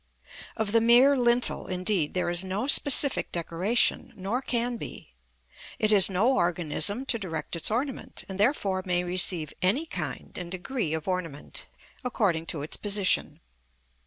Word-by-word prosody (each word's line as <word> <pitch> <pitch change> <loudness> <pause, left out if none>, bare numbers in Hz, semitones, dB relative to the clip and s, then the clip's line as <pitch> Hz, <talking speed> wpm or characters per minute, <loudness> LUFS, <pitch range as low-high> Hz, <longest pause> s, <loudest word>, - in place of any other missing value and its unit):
Of 220 -2 -2
the 230 +1 +3
mere 245 +5 +5
lintel, 245 -1 +1
indeed, 185 -3 -1
there 180 -1 -1
is 175 +1 +2
no 190 +5 -3
specific 285 -1 +6
decoration, 180 +6 -1
nor 200 +7 -3
can 240 -2 -2
be; 65 - -10 0.6
it 215 - 0
has 200 -2 +5
no 210 +8 +1
organism 175 - 0
to 235 -3 -1
direct 165 -5 -5
its 165 - -3
ornament, 255 +5 -4
and 190 0 -8
therefore 205 -5 0
may 180 -1 0
receive 175 -3 +2
any 225 - +1
kind - - -6
and 180 -1 -7
degree 185 - -4
of 160 +2 -7
ornament, 170 -6 -5 0.4
according 190 -10 -1
to 150 -4 -3
its 150 - -5
position. 205 -2 0
195 Hz, 150 wpm, -26 LUFS, 175-235 Hz, 0.6 s, specific